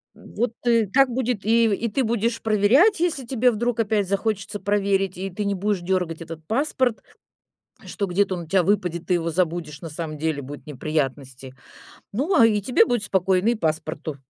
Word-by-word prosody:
Вот, 235 +2 -4
и 230 -2 +4
так 260 +7 +3
будет, 245 -3 -2
и 230 +1 +4
и 225 +2 0
ты 255 +5 0
будешь 230 +1 -1
проверять, 240 - +4
если 320 -7 0
тебе 250 0 +2
вдруг 235 +1 -1
опять 210 -2 0
захочется 200 +1 -2
проверить, 195 -2 0
и 190 +1 -4
ты 200 +3 -4
не 200 0 -1
будешь 200 0 -1
дергать 175 -2 -2
этот 165 -1 -8
паспорт, 255 -1 0 0.8
что 205 - -3
где-то 190 +1 0
он 175 - -5
у - - -12
тебя 185 +2 +2
выпадет, 180 -3 0
ты 180 - +2
его 170 -1 -1
забудешь, 165 -3 -2
на 165 - -7
самом 155 0 -6
деле 155 -1 -2
будут 145 +2 -9
неприятности. 135 -3 -4 0.6
Ну, 285 - 0
а, 230 - +8
и 210 -2 +1
тебе 230 +2 +3
будет 240 -3 -1
спокойно, 190 0 +1
и 240 - +2
паспорту. 155 -4 -3
200 Hz, 185 wpm, -23 LUFS, 170-230 Hz, 0.8 s, а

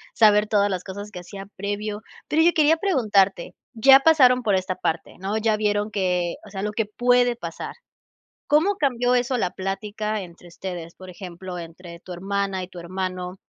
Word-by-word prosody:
saber 210 -1 +5
todas 205 -1 +2
las 180 -1 -3
cosas 205 +2 -8
que 180 - -7
hacía 195 +2 -9
previo. 205 +1 -4 0.3
Pero, 315 - +2
oye, 340 +1 +5
quería 315 0 +4
preguntarte, 210 - +1 0.2
ya 270 +4 +7
pasaron 270 -4 +5
por 210 -5 +2
esta 185 0 -1
parte, 165 -1 -3
¿no? 195 +3 -2
Ya 220 0 +2
vieron 210 0 0
que, 180 -4 -1
o 215 - -13
sea, 195 -1 -5
lo 210 - -1
que 220 +1 -1
puede 245 +2 +2
pasar. 235 - -7 0.7
¿Cómo 340 +7 +3
cambió 250 -5 +1
eso 250 +1 +1
la 185 -7 0
plática 205 +3 -3
entre 175 -1 -13
ustedes? 170 -1 -7
Por 185 0 -11
ejemplo, 180 0 -8
entre 170 0 -10
tu 185 - -10
hermana, 195 +1 -2
y 180 - -7
tu 180 - -12
hermano, 185 +1 -4
205 Hz, 180 wpm, -23 LUFS, 185-235 Hz, 0.7 s, ya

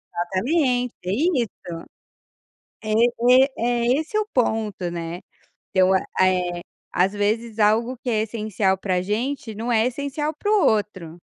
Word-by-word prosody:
Exatamente, 245 - 0
é 185 - -1
isso. 260 - +1 1.3
É 215 0 -2 0.5
é - - -7 0.4
é 275 - +3
esse 330 +7 -3
o 430 - +1
ponto, 220 -7 0
né. 170 +1 -5 0.5
Então, 185 0 +4
eh, 180 -2 0 0.3
às 190 +3 +2
vezes 220 +2 -1
algo 230 +4 +2
que 250 - -5
é 215 -2 +1
essencial 210 -3 -1
pra 185 -2 -1
gente 225 +4 -3
não 235 +3 -3
é 225 0 +3
essencial 285 +4 -3
para 410 - -3
o 420 -3 +4
outro. 185 -6 -1
220 Hz, 140 wpm, -23 LUFS, 190-250 Hz, 1.3 s, Então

